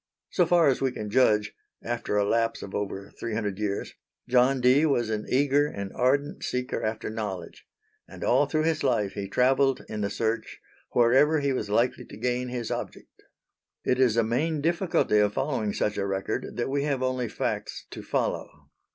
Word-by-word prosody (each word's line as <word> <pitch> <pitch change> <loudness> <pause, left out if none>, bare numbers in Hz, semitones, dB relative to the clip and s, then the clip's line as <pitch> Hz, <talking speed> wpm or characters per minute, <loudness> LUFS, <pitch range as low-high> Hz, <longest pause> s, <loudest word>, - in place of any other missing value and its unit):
So 180 - +3
far 170 -2 +5
as 135 - +2
we 135 -1 +1
can 105 -4 -6
judge 105 -4 +3 0.3
after 115 -3 -2
a 100 - +3
lapse 115 +2 0
of 100 - -8
over 100 -1 -4
three 115 -2 -3
hundred 105 -3 -2
years, 100 -2 -2 0.3
John 130 +2 +4
Dee 130 +4 +5
was 120 -6 +1
an 105 -1 -3
eager 145 +2 +3
and 100 -8 -6
ardent 140 +4 0
seeker 125 0 -2
after 110 0 -2
knowledge; 100 -6 -6 0.4
and - - -9
all - - +3
through 155 -1 0
his 160 -1 0
life 105 -4 +1
he 100 -1 -4
travelled 135 +3 +2
in 105 -1 -4
the 100 - 0
search 115 +1 -2 0.3
wherever 135 +6 +4
he 140 -1 0
was 105 -5 -3
likely 120 +4 +1
to - - -11
gain 125 0 -1
his 120 -2 -4
object. - - -6 0.6
It 125 - +1
is 120 -4 +3
a 115 - +4
main 145 +8 0
difficulty 170 - +2
of 105 0 +2
following 135 -7 -1
such 105 0 -1
a 100 - -1
record 95 +1 -3
that 120 - -1
we 140 0 +1
have 135 -3 -1
only 130 -2 -1
facts - - -3
to - - -7
follow. - - -3
120 Hz, 185 wpm, -27 LUFS, 105-135 Hz, 0.6 s, far